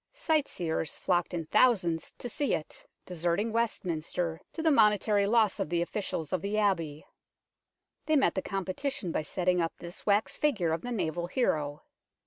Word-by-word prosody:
Sightseers 275 - -1
flocked 175 -2 0
in 170 -2 -3
thousansd 185 -5 +2
to - - -5
see 280 +4 0
it, 155 - -8 0.2
deserting 175 +5 0
Westminster, 175 -7 -1
to 320 - -5
the 320 - +4
monetary 210 -4 +4
loss 220 -2 +3
of - - -1
the 170 0 +1
officials 175 -4 -4
of 185 - 0
the 205 +3 -2
Abbey. 165 -8 0 1.0
They 310 - +3
met 275 - +3
the 190 - -1
competition 195 +3 -3
by - - 0
setting 180 +3 0
up 165 - -1
this 175 +2 -9
wax 205 +1 +2
figure 200 - +1
of 165 - -2
the 245 - -5
naval 175 -5 -2
hero. 150 - -1
185 Hz, 160 wpm, -30 LUFS, 170-220 Hz, 1.0 s, the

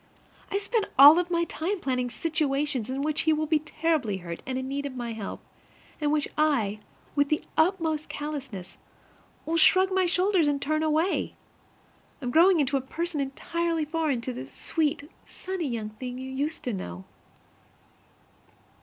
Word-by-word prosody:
I 400 - +1
spend 420 +1 -1
all 285 +3 +11
my 345 - +3
spare 340 -1 0
time 360 +5 -3
planning 250 -4 -1
situations 285 -5 -1
in 270 +2 -2
which 305 0 0
he 315 - +3
will 310 0 0
be 310 0 +2
terribly 305 -8 -1
hurt 170 -2 -7
and 260 -1 -2
in 260 0 -3
need 285 +1 -2
of 265 - -8
my 240 -2 -4
help, 215 -3 -6 0.6
and 300 - 0
in - - +2
which 300 -1 +1
1, 235 -10 +2 0.4
with 285 -1 +2
the 305 - 0
utmost 320 -2 +1
callousness, 275 -11 -6 0.7
will 330 +1 0
shrug 375 +3 +5
my 375 -1 +2
shoulders 365 -2 +3
and 285 -1 +1
turn 310 +2 0
away. 315 +4 +1 0.8
I 275 - -7
am 245 - -1
growing 345 +3 +6
into 280 -1 +2
a - - -2
person 325 +3 -3
entirely 330 +4 -2
foreign 305 -5 -1
to 255 +2 -4
the 130 - -7
sweet, 300 - -1 0.2
sunny 370 -4 -4
young 225 -4 -3
thing 250 +3 -7
you 260 +1 -6
used 290 +5 -3
to 250 -5 -2
know. 90 - -6
300 Hz, 170 wpm, -27 LUFS, 260-330 Hz, 0.8 s, all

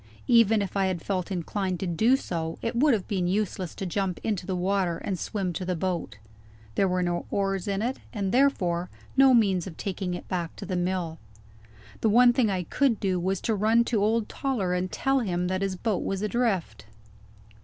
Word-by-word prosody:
Even 225 -3 +5
if 195 - -6
I 195 -1 +2
had 180 -3 -3
felt 185 -1 -2
inclined 185 0 -2
to - - -2
do 220 +10 +3
so, 165 -9 -4
it 230 +1 -2
would 270 +1 +4
have 195 - -5
been 185 -4 0
useless 190 -2 -2
to 195 - -4
jump 185 0 -2
into 200 -5 -2
the 190 - -1
water 180 -1 0
and 185 0 -4
swim 195 -5 -2
to 185 - -4
the 180 0 -1
boat. 170 - -3 0.6
There 195 - +2
were 180 0 0
no 175 -1 -2
oars 195 -1 -1
in 200 +1 -1
it, 250 +3 -1
and 200 -4 -2
therefore 180 -10 +2 0.3
no 270 -1 +7
means 195 -6 +2
of 165 - -9
taking 185 -2 -3
it - - -8
back 175 -3 -3
to 200 - -7
the 185 -1 -3
mill. 175 -2 -2 0.8
The 220 - +2
one 240 +3 +6
thing 240 -3 +2
I 185 -2 -1
could 250 - +1
do 185 -2 0
was 190 +1 -1
to 225 - 0
run 220 +3 +3
to 230 -3 0
old 220 +1 +1
Toller 225 -10 -1
and 180 0 -1
tell 270 0 +1
him 180 -6 -1
that 185 0 -1
his 195 -1 -1
boat 205 +1 -1
was 195 +1 -2
adrift. 215 -5 -1
195 Hz, 210 wpm, -27 LUFS, 180-220 Hz, 0.8 s, no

